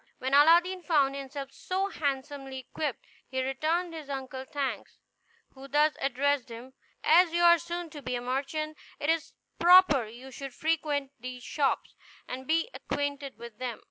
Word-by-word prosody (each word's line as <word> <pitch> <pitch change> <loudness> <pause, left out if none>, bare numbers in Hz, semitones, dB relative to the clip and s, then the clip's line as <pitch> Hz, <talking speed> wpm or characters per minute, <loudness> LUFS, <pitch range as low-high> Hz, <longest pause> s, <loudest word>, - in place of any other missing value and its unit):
When 260 +1 -3
Aladdin 340 +6 +6
found 285 -6 +2
himself 275 0 -6
so 380 +6 -2
handsomely 275 -3 -3
equipped, 270 +1 -4 0.2
he 260 -1 -1
returned 320 +6 -1
his 310 -3 -8
uncle 265 -1 -5
thanks, 280 -1 -4 0.6
who 270 0 -11
thus 295 +2 +3
addressed 275 0 +1
him: 240 +3 -10 0.3
"As 335 +2 +5
you 345 0 +2
are 340 -1 +7
soon 345 0 -5
to 290 - -8
be 255 -1 -3
a 240 - -3
merchant, 285 +5 -3 0.2
it 290 - +2
is 325 -2 -2 0.3
proper 345 - +7
you 245 +4 -11
should 270 0 -8
frequent 300 -4 0
these 250 +1 -7
shops, 275 +2 0 0.3
and 260 +1 -6
be 330 +4 +2
acquainted 285 -1 -3
with 235 -2 -11
them." 250 -3 -4
280 Hz, 160 wpm, -29 LUFS, 265-320 Hz, 0.6 s, are